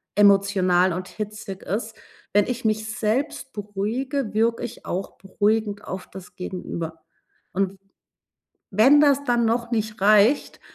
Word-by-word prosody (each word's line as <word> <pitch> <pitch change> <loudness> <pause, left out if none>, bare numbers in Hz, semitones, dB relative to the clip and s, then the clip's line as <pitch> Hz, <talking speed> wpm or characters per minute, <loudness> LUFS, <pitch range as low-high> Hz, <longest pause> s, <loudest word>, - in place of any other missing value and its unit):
emotional 195 -3 +4
und 180 +2 -4
hitzig 210 -2 -7
ist, 220 +3 -3 0.4
wenn 205 0 +4
ich 250 -1 -4
mich 215 0 0
selbst 230 +5 -2
beruhige, 215 +5 -3
wirke 230 +2 +1
ich 240 - -7
auch 190 +2 -3
beruhigend 205 +2 0
auf 190 0 -6
das 190 -1 -12
Gegenüber. 170 -3 -6 0.5
Und, 195 0 -1 1.0
wenn 260 +9 +6
das 285 -1 +4
dann 240 -2 +2
noch 235 +1 -1
nicht 215 -2 -2
reicht, 215 +6 +4
210 Hz, 130 wpm, -24 LUFS, 195-230 Hz, 1.0 s, wenn